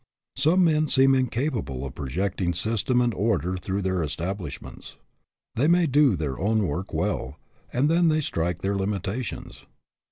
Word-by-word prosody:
Some 160 +7 +3
men 155 -2 +3
seem 135 -1 +4
incapable 125 - -1
of 65 - -7
projecting 85 +5 -2
system 115 +6 +1
and 120 -1 +1
order 95 -3 0
through 95 +2 -3
their 95 -1 0
establishments. 90 +6 -5 0.6
They 135 +6 +1
may 175 +1 +4
do 140 -5 +4
their 75 -5 -3
own 105 +2 +1
work 90 +3 -3
well, 80 -5 -2 0.3
and 130 +4 +2
then 170 +2 +3
they 155 -1 +2
strike 85 - -2
their 100 +1 0
limitations. 100 +4 -4
100 Hz, 150 wpm, -25 LUFS, 90-135 Hz, 0.6 s, seem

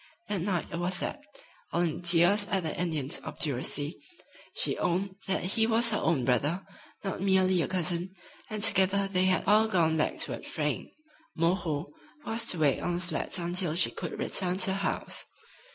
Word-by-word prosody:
That 200 -4 -1
night 180 -2 -1
it 170 - -4
was 180 +1 -1
that, - - -3 0.5
all - - 0
in 170 -1 -1
tears 175 +4 +5
at 195 -4 -1
the 160 - -3
Indian's 155 -6 -1
obduracy, 145 +2 -2 0.6
she - - +4
owned 185 +2 -1
that 190 - +1
he 220 +5 +2
was 230 0 +3
her 210 - 0
own 155 -7 +1
brother, 145 - +1 0.4
not 195 -2 -4
merely 190 -2 +3
a - - -1
cousin, 180 0 -1 0.4
and 215 -2 -3
together 195 -2 +3
they 185 -1 +1
had 185 0 +2
all 215 +2 +4
gone 165 -6 +2
back 155 - 0
toward - - -3
Frayne. - - -2 0.5
"Moreau" 165 - -1 0.3
was 230 +1 +1
to 180 - +5
wait 145 -4 +2
on 175 - -2
the - - -2
flats 180 +2 -2
until 175 -1 -1
she 175 - +5
could 170 -4 -6
return 180 -1 -1
to 190 - +2
the - - 0
house. 195 +1 -3
180 Hz, 180 wpm, -29 LUFS, 165-195 Hz, 0.6 s, tears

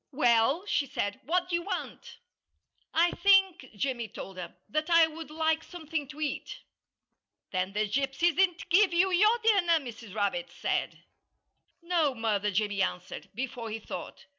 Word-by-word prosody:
"Well," 260 - +3
she 290 -8 0
said, 205 -1 -3
"what 360 +4 +1
do 360 - -7
you 345 - +2
want?" 365 0 -6 0.7
"I 340 +2 +3
think," 385 -7 +3
Jimmy 240 +1 -2
told 195 -2 -9
her, 175 -1 -7
"that 310 +9 -2
I 335 -1 +7
would 320 0 -8
like 320 +1 0
something 320 -4 -5
to 270 +3 -11
eat." 295 -3 -4 0.9
"Then 185 +1 -1
the 210 +1 0
gypsies 275 +8 +1
didn't 370 -1 +1
give 380 +1 +5
you 370 +2 +3
your 425 +6 +4
dinner," 395 -6 +4
Mrs. 230 -7 -8
Rabbit 255 +6 -1
said. - - -3 0.8
"No, 335 -6 +1
Mother!" 210 -3 0
Jimmy 205 0 0
answered, 180 -1 -3
before 240 -2 -4
he 220 - -3
thought. 220 - -8
295 Hz, 155 wpm, -29 LUFS, 225-345 Hz, 0.9 s, I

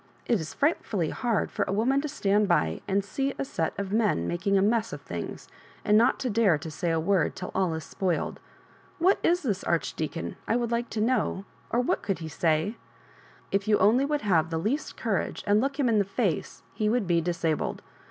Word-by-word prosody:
It 235 -4 +2
is 160 - -6
frightfully 225 - 0
hard 235 -4 -1
for - - -3
a - - -1
woman 245 +7 +2
to 300 - -3
stand 205 -5 +1
by 80 - +1
and 195 0 +1
see 270 +7 -2
a - - -2
set 165 -10 -2
of 200 -1 -3
men 210 - +2
making 195 +3 +1
a - - +4
mess 225 +1 +1
of 145 - -6
things, 85 - -6 0.4
and 210 - +4
not 235 +4 +5
to 255 - -1
dare 205 -7 +4
to 160 +2 -7
say 170 +3 -2
a 165 0 +1
word 175 0 +1
till 185 - -6
all 185 -4 +1
is 160 - -5
spoiled. 180 +2 -2 0.6
What 370 +4 +3
is 350 +1 +2
this 205 -8 -1
Archdeacon, 165 -1 -2
I - - +2
would 240 -1 0
like 235 +1 -1
to 215 - -2
know, 220 -4 0 0.2
or 240 - +2
what 250 - 0
could 195 -2 -1
he 160 -1 -6
say? 160 +7 0 0.7
K 195 - +3
you 215 -1 +4
only 240 +6 +4
would 295 +1 0
have 170 -6 +2
the 165 - -2
least 225 - -2
courage, - - -2
and 205 +1 +4
look 275 +2 -2
him 270 - +3
in 220 -3 +3
the 200 - +2
iace, 195 -4 -2
he 210 -1 0
would 235 -1 +1
be 170 -1 +2
disabled. 165 -2 -1
200 Hz, 215 wpm, -27 LUFS, 170-235 Hz, 0.7 s, not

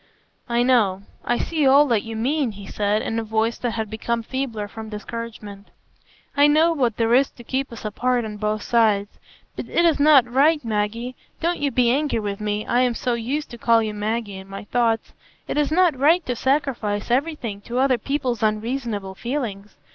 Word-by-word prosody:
"I 235 0 +2
know; 210 -7 +2 0.2
I 240 - 0
see 310 -1 0
all 280 +2 +7
that 225 -3 +2
you 225 +1 -7
mean," 260 +1 0
he 200 0 -10
said, 210 +2 0
in 225 - -2
a - - -3
voice 220 +1 -1
that 240 -2 -2
had 220 -1 -2
become 230 +2 -3
feebler 235 -5 -3
from 220 +1 -9
discouragement; 210 -2 -7 0.7
"I 285 +1 +6
know 315 +3 +4
what 245 -8 0
there 230 0 +2
is 270 +2 +4
to 240 - -15
keep 265 +3 -2
us 230 - -9
apart 245 +3 0
on 210 -1 -6
both 210 0 -2
sides. 215 -3 +1 0.4
But - - -6
it 345 - +2
is 325 -4 +3
not 285 -4 +6
right, 285 +3 +3
Maggie,—don't 230 +10 -3
you 290 - +1
be 250 -3 +2
angry 290 0 +1
with 205 -1 -4
me, 210 0 -2
I 245 - +2
am 250 -2 +1
so 245 +2 -1
used 255 +6 -3
to 235 - -9
call 230 -1 +4
you 215 -1 -3
Maggie 210 -1 -3
in 190 0 -10
my 195 - -7
thoughts,—it 225 +1 -2
is 295 0 +1
not 345 -2 +4
right 310 +6 +3
to 250 - -2
sacrifice 240 -6 -1
everything 250 -6 -1
to 240 +4 -5
other 260 -2 +3
people's 255 -2 -2
unreasonable 215 -2 -2
feelings. 210 - -5
235 Hz, 190 wpm, -22 LUFS, 215-270 Hz, 0.7 s, all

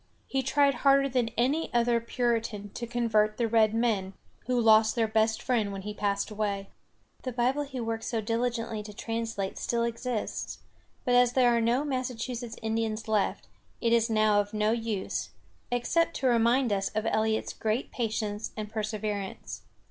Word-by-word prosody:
He 270 - -1
tried 280 +2 +3
harder 275 0 +5
than 250 -3 +1
any 275 +7 +1
other 235 0 +3
Puritan 230 -4 -1
to 235 - -5
convert 220 -3 +1
the 235 - +1
red 220 -1 +3
men, 210 -5 0 0.3
who 250 -1 +2
lost 220 -1 +5
their 230 -2 +2
best 220 0 +1
friend 225 -6 +1
when 195 -1 -6
he 210 +1 -4
passed 200 0 -1
away. 200 -2 -2 0.5
The 255 - -4
Bible 250 +4 +1
he 265 -2 -6
worked 225 -1 -3
so 230 - -1
diligently 230 0 -1
to 210 0 -9
translate 225 -3 -3
still 235 -1 0
exists; 235 -1 -3 0.5
but 245 - +2
as 245 0 +5
there 245 -2 +4
are 235 - +2
no 240 +5 +2
Massachusetts 250 -3 -3
Indians 220 0 -1
left, 215 -2 0 0.3
it 230 -1 +2
is 230 0 +3
now 215 -1 +4
of 205 +1 -2
no 210 0 +2
use, 225 -4 -2 0.4
except 330 +8 +1
to 270 - -3
remind 235 0 +3
us 195 -1 0
of 215 - 0
Eliot's 220 0 0
great 220 +4 -2
patience 215 -2 -2
and 210 -1 -5
perseverance. 210 -2 -4
230 Hz, 165 wpm, -28 LUFS, 215-245 Hz, 0.5 s, harder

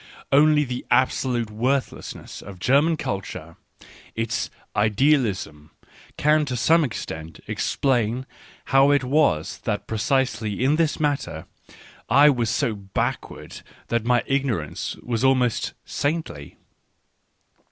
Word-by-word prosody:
Only 150 +1 +5
the 125 -2 -5
absolute 125 -3 +1
worth 130 +5 0
1 - - -10
lessness - - -9
of 100 -1 -10
German 145 - +3
culture 85 - -5 0.3
— - - -20 0.3
its 115 0 -2
" - - -34
idealism 105 - 0 0.2
" - - -25
— - - -27
can 150 +1 +3
to 125 -3 -3
some 165 +8 +4
extent 80 - -6
explain 125 -2 0 0.5
how 135 +1 +6
it 145 -2 +3
was 130 - +1
that - - -3
precisely 115 -2 -1
in 145 +4 +3
this 165 -2 +1
matter 145 -2 -2 0.6
I 140 +5 +7
was 120 -4 -1
so 110 - 0
backward 100 -2 -4 0.3
that 115 -1 0
my 120 +1 +2
ignorance 130 - -2
was 120 0 -2
almost 130 -3 +2
saintly. 145 - -3
125 Hz, 130 wpm, -23 LUFS, 110-140 Hz, 0.6 s, I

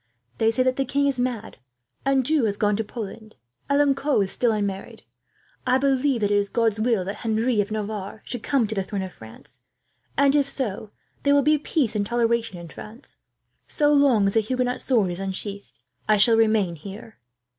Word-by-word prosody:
They 225 - +4
say 225 +3 +1
that 255 0 +1
the 270 - +2
king 280 +2 0
is 275 -3 0
mad. 245 -3 -3 0.5
Anjou 275 0 +2
has 205 -2 -1
gone 210 -1 +2
to 225 - -1
Poland. 220 0 -8 0.3
Alencon 280 -4 +2
is 190 - -5
still 240 -2 +2
unmarried. 200 -2 -3 0.6
I 255 +1 +4
believe 270 -2 +1
that 205 0 +1
it 205 - +4
is 200 0 0
God's 225 -2 +1
will 220 -4 +1
that 195 - -4
Henry 225 0 +1
of 200 - -4
Navarre 215 -1 -5
should 245 - -4
come 270 -2 +1
to 220 - -3
the 195 - -1
throne 195 0 -4
of 185 - -7
France, 110 +3 -15 0.6
and 280 0 +4
if 280 -2 +2
so, 220 -6 -3 0.3
there 285 0 +3
will 285 - +4
be 305 +1 +3
peace 275 -6 -1
and 205 - +1
toleration 230 -2 0
in 170 -1 -9
France. 220 - -9 0.5
So 295 0 +2
long 275 -8 +4
as 195 - 0
a - - +6
Huguenot 250 +3 -1
sword 220 -8 +2
is 175 - -6
unsheathed, 195 +1 -5 0.3
I 215 - +5
shall 225 +3 +5
remain 215 -6 +2
here." 200 +7 -10
225 Hz, 195 wpm, -24 LUFS, 205-260 Hz, 0.6 s, a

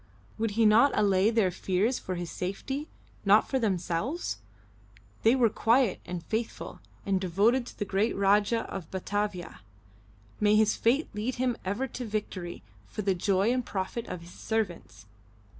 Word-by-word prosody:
Would 225 -1 0
he 230 - +5
not 230 +6 +5
allay 195 0 +4
their 220 -5 +2
fears 195 +8 0
for 185 - -4
his 175 -2 -5
safety, 265 - -4 0.4
not 205 +2 +5
for 265 - 0
themselves? 195 - -1 0.8
They 225 +3 +5
were 250 -3 +4
quiet 225 0 +2
and 175 -1 -5
faithful, 220 +4 -4 0.3
and 195 -1 +1
devoted 215 +8 +2
to - - -11
the 205 - -2
great 200 +3 0
Rajah 205 +3 +2
in 190 -4 -5
Batavia 190 - -3 0.8
may 210 0 +4
his 215 0 +4
fate 265 +7 +2
lead 225 +5 -2
him 250 -1 0
ever 205 +8 -1
to 250 - -6
victory 205 -5 -4 0.2
for 210 - -5
the 195 0 +2
joy 195 +4 +2
and 255 -1 0
profit 205 +3 -4
of 180 - -6
his 170 +1 -13
servants! 175 - -3
210 Hz, 160 wpm, -29 LUFS, 185-230 Hz, 0.8 s, he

